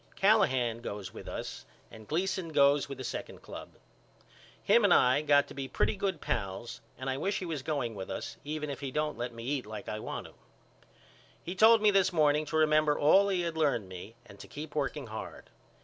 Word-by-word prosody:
Callahan 130 - +3
goes 100 -4 -6
with - - -10
us - - -6 0.3
and 110 -1 -12
Gleason 185 +2 -1
goes 140 -2 +3
with 140 - -6
the 130 - -6
second 120 - -6
club. - - -10 0.9
Him - - +4
and - - +4
I 125 +2 +5
have 150 +1 -3
got 145 -1 +5
to - - -9
be 135 -1 -5
pretty - - 0
good 190 -4 -2
pals 105 +5 -4 0.2
and 130 - -6
I 130 0 -1
wish 195 +7 -1
he 185 - -4
was 160 -5 -3
going 135 -6 -2
with 95 -2 -7
us 115 0 -5
even 150 0 -4
if 140 - -6
he 140 -1 -4
don't 150 +2 -1
let 120 +1 -3
me 115 0 -9
eat 130 -2 -2
like 110 -1 -7
I 105 - -4
want - - -5
to. - - -13 1.1
He 175 - -4
told 220 +3 +6
me 210 - +6
this 190 -1 +3
morning 150 -2 +3
to 160 - -1
remember 155 -1 +3
all 195 +7 +5
he 185 -2 +1
had 170 -1 -3
learned 145 -10 +1
me 95 +5 -9
and 100 -3 -15
to - - -10
keep 150 0 -8
working 145 -1 -2
hard. 110 -1 -8
145 Hz, 215 wpm, -30 LUFS, 120-160 Hz, 1.1 s, told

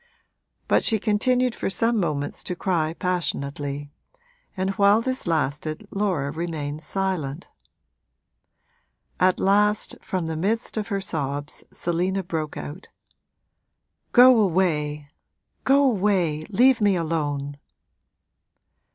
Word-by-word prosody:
But - - +3
she 225 - +3
continued 245 +4 +2
for - - -3
some 225 +4 +1
moments 150 -5 -2
to 180 - -3
cry 165 -3 -1
passionately, 145 -5 -2 0.7
and 190 +1 0
while 200 +1 +4
this 255 -2 -3
lasted 155 -1 -1
Laura 185 -9 -1
remained 155 -2 -4
silent. 180 -6 -3 1.7
At 185 0 +3
last 210 +2 +2
from 185 -4 -3
the 160 0 -3
midst 210 +8 -1
of 215 -2 -2
her 200 -3 -2
sobs 145 -5 -4
Selina 180 +3 -1
broke 160 -3 -4
out, 160 +7 -8 1.2
'Go 250 -1 +7
away, 155 -7 +1 0.6
go 275 +1 +5
away 185 - +1
leave 245 +3 +4
me 205 -2 +4
alone!' 145 -4 -2
180 Hz, 110 wpm, -24 LUFS, 150-205 Hz, 1.7 s, Go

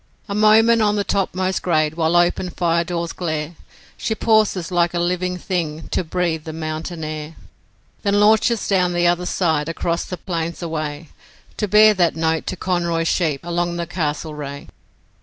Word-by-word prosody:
A 200 - -4
moment 220 +2 +5
on 210 -1 +2
the 205 - 0
topmost 190 -1 -1
grade 155 -3 +1
while 165 +1 0
open 175 +1 +2
fire 170 -1 +1
doors 170 -1 -3
glare, 155 -2 -3 0.4
She 220 - -2
pauses 215 -6 +2
like 175 -1 +1
a - - +1
living 180 +1 -1
thing 165 -4 -3
to - - 0
breathe 165 -2 -1
the 160 - -5
mountain 160 +1 -5
air, 155 +1 -6 0.7
Then 205 -1 +2
launches 220 +1 +3
down 180 -3 +2
the 175 0 +1
other 175 +1 +2
side 160 -4 0
across 170 +1 -1
the 180 - -6
plains 170 -1 -4
away 155 -2 -4 0.5
To 210 - -1
bear 215 +1 +6
that 175 -4 +2
note 160 0 0
to - - -2
'Conroy's 170 -2 0
sheep 155 -6 0
along 175 0 -1
the 170 0 -3
Castlereagh'. 150 -3 -4
175 Hz, 165 wpm, -20 LUFS, 160-185 Hz, 0.7 s, bear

